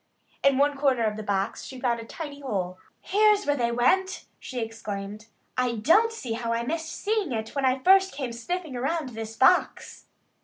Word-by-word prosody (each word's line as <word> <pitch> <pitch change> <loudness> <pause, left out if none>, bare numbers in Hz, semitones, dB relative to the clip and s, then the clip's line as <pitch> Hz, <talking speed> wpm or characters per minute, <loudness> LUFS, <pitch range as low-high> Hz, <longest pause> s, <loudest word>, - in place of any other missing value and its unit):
In 275 -1 +4
one 285 +1 +2
corner 270 -4 +2
of 215 -1 0
the 215 - -5
box 200 -2 -2
she 260 - -9
found 240 -2 0
a 230 - -8
tiny 290 +2 -7
hole. 185 -9 -3 0.2
"Here's 420 +1 +3
where 290 - +2
they 235 -3 0
went!" 370 +11 +1
she 255 - -6
exclaimed. 210 -2 -6 0.3
"I 250 -2 0
don't 335 - +4
see 265 - -5
how 230 0 -3
I 230 0 -1
missed 320 +5 -3
seeing 420 -6 -1
it 220 -2 -3
when 275 -2 0
I 255 0 +3
first 385 0 +6
came 260 -4 -5
sniffing 315 +4 -4
around 275 +3 -2
this 225 -1 -7
box." 355 +8 +2
255 Hz, 190 wpm, -26 LUFS, 225-325 Hz, 0.3 s, first